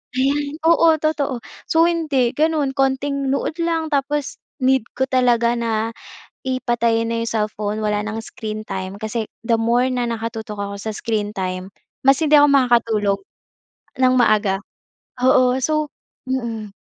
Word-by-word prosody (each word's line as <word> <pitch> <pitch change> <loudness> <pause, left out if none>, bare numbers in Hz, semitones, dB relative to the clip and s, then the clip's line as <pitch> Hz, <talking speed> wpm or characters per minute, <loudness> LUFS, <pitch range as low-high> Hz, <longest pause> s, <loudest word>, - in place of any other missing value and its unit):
Ayan, 285 +3 0
oo 335 0 +5
totoo. 285 -6 -1 0.2
So 325 0 +4
hindi 305 -8 +1
ganun 305 -3 +1
konting 270 +1 0
nood 280 +4 -1
lang, 330 -2 -1
tapos 285 0 -1 0.2
need 260 -3 +3
ko 265 - 0
talaga 240 -2 +3
na 225 -1 -1 0.5
i 260 -1 -1
patayin 230 -2 +1
na 230 - -1
'yong - - -3
cellphone, 210 -1 -2
wala 210 -1 0
nang 215 +1 -4
screen 215 -1 -6
time 190 +1 -5
kasi 220 +1 -2 0.2
the 230 0 +1
more 235 +3 +2
na 250 -1 -1
nakatutok 225 -2 -4
ako 200 0 -4
sa 215 +2 -5
screen 210 -1 -2
time 185 -1 -4 0.3
mas 270 +2 +5
hindi 305 -1 +5
ako 290 0 +7
makakatulog 230 -6 +3 0.8
ng 255 0 +4
maaga, 210 -5 +3 0.7
oo. 255 0 +4
So 305 +2 0 0.4
mm. 230 -5 -3
240 Hz, 145 wpm, -20 LUFS, 220-275 Hz, 0.8 s, ako